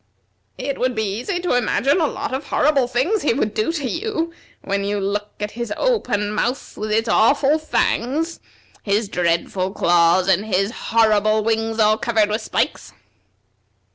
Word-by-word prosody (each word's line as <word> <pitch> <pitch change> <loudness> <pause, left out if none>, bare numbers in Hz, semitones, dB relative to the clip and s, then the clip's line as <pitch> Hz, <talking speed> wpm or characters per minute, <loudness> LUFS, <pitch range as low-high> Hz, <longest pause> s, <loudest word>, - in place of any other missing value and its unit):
It 280 - -4
would 255 0 0
be 220 - 0
easy 235 - -3
to 355 - 0
imagine 250 - +2
a 310 - +3
lot - - -4
of 275 +2 -4
horrible 280 -4 +2
things 265 - 0
he 260 - +1
would 215 -2 -1
do 215 +9 0
to 290 -5 -2
you 335 - -3 0.3
when 200 0 -1
you 205 +1 -1
look 205 +1 -3
at 210 0 -3
his 235 -2 -5
open 210 - 0
mouth 245 +5 -2
with 215 0 -4
its 225 +2 +1
awful 280 +7 +3
fangs, 310 +1 -1 0.4
his 205 +1 0
dreadful 180 +1 -1
claws, 175 -1 +3
and 195 +3 +2
his 195 +1 +1 0.2
horrible 215 -1 +3
wings 225 0 -1
all 215 0 +4
covered 220 -3 +1
with 215 +2 -1
spikes." - - -2
220 Hz, 165 wpm, -20 LUFS, 205-270 Hz, 0.4 s, all